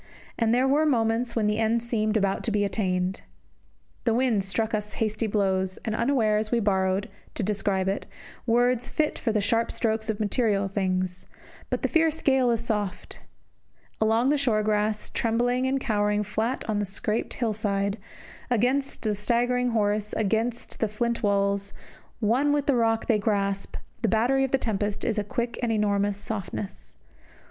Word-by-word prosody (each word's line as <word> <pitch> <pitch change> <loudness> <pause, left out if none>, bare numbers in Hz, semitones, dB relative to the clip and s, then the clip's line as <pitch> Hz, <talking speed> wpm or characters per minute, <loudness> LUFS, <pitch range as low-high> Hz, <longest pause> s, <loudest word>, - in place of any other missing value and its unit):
And 230 -1 +1
there 250 +3 +3
were 290 +3 +3
moments 235 -2 +1
when 225 -2 +1
the 210 +1 +1
end 225 +1 +1
seemed 220 -2 0
about 195 -2 0
to 230 - 0
be 205 -1 +2
attained. 185 -2 -1 0.8
The 230 -2 +2
wind 240 -5 +2
struck 215 +4 -1
us 210 0 -2
hasty 220 0 -1
blows, 190 -2 0
and 220 - -1
unawares 220 -4 +1
we 240 - +3
borrowed, 190 -1 +1 0.3
to 220 - -1
describe 195 -1 0
it, 195 +1 -2 0.4
words 245 +1 +2
fit 305 -1 0
for 230 - 0
the 215 -1 +1
sharp 230 +3 +1
strokes 220 -1 -1
of 220 -1 -1
material 210 -2 +1
things; 185 -2 -1 0.4
but - - -2
the - - +3
fierce 325 -1 +2
gale 265 -3 +3
is 235 0 0
soft. 210 -4 -2 0.8
Along 225 +4 +3
the 295 0 +2
short 220 -6 +1
grass, 210 0 0
trembling 245 +3 +1
and 270 +1 +1
cowering 210 -4 +1
flat 220 +4 -2
on 215 -2 0
the 205 - 0
scarped 210 +3 -2
hill 230 -3 0
side, 200 -1 -1 0.5
against 255 +4 +1
the 215 -2 +1
staggering 245 +4 +1
horse, 210 -2 0
against 225 +3 -1
the 220 - +2
flint 235 +3 -2
walls, 200 -1 +1 0.4
one 245 +6 +2
with 290 -1 +1
the 280 - +3
rock 225 -1 +2
they 220 -3 +2
grasp, 200 -1 -1 0.3
the 230 - +2
battery 245 +6 +2
of 270 - 0
the 270 - +3
tempest 210 -4 -2
is 220 -2 0
a - - 0
quick 235 +3 -3
and 240 -2 0
enormous 205 -2 +1
softness. 205 -1 -5
220 Hz, 170 wpm, -26 LUFS, 205-235 Hz, 0.8 s, there